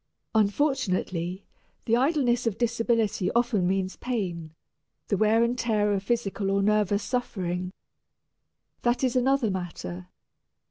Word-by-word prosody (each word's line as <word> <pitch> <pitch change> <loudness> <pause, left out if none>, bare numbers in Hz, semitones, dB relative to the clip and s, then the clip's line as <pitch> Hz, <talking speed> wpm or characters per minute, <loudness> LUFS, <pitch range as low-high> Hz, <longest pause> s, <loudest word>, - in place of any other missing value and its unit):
Unfortunately, 200 - 0 0.4
the 230 - +3
idleness 250 -3 +2
of 215 - -1
disability 230 -4 +1
often 235 -6 +2
means 190 0 -1
pain, 175 -10 -4 0.5
the - - +2
wear 220 +3 +3
and 235 +1 +1
tear 210 -3 +1
of 195 - 0
physical 200 -2 -1
or 195 0 +2
nervous 210 -1 +2
suffering. 185 -8 -2 1.1
That 240 +2 +1
is 255 -1 +1
another 255 -3 +2
matter. 90 - -5
210 Hz, 120 wpm, -27 LUFS, 190-240 Hz, 1.1 s, the